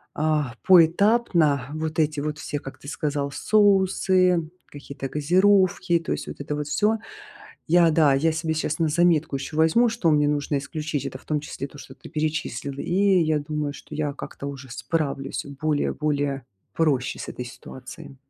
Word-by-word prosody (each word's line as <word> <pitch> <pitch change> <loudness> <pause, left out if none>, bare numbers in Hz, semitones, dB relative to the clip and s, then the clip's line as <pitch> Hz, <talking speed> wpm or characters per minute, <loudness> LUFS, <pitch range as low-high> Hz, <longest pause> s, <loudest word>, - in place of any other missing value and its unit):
а, 150 -4 0
поэтапно 170 - +4
вот 155 0 -3
эти 150 -1 +1
вот 150 +1 -3
все, 145 - -4
как 135 - -10
ты 140 - -13
сказал: 145 -2 -2
соусы, 185 -2 +3 0.2
какие-то 140 -1 -7
газировки, 185 +4 +3
то 165 - -6
есть - - -3
вот - - -7
это 145 - -4
вот 150 -1 -4
всё. 210 +8 +1 0.7
Я, 170 0 +5
да, 155 -3 +4
я 155 +4 +2
себе 160 0 -2
сейчас 155 -1 -2
на 165 -2 +2
заметку 160 -3 +2
еще 140 +3 -6
возьму, 160 +10 +4
что 220 -8 +1
мне 150 -1 +3
нужно 145 0 0
исключить. 145 0 -4
Это - - -6
в - - -22
том 150 -1 -1
числе 140 -2 -6
то, 145 - -15
что - - -11
ты - - -14
перечислил. 150 -4 -3
И - - -4 0.4
я 155 -1 +1
думаю, 150 0 -3
что - - -11
я 150 -1 -1
как-то 140 - -8
уже 140 -1 -9
справлюсь 140 0 -3
более 155 -2 0
более 145 -3 -1 0.3
проще 140 -7 0
с - - -7
этой 125 - -6
ситуацией. 130 +2 -11
150 Hz, 175 wpm, -24 LUFS, 145-165 Hz, 0.7 s, Я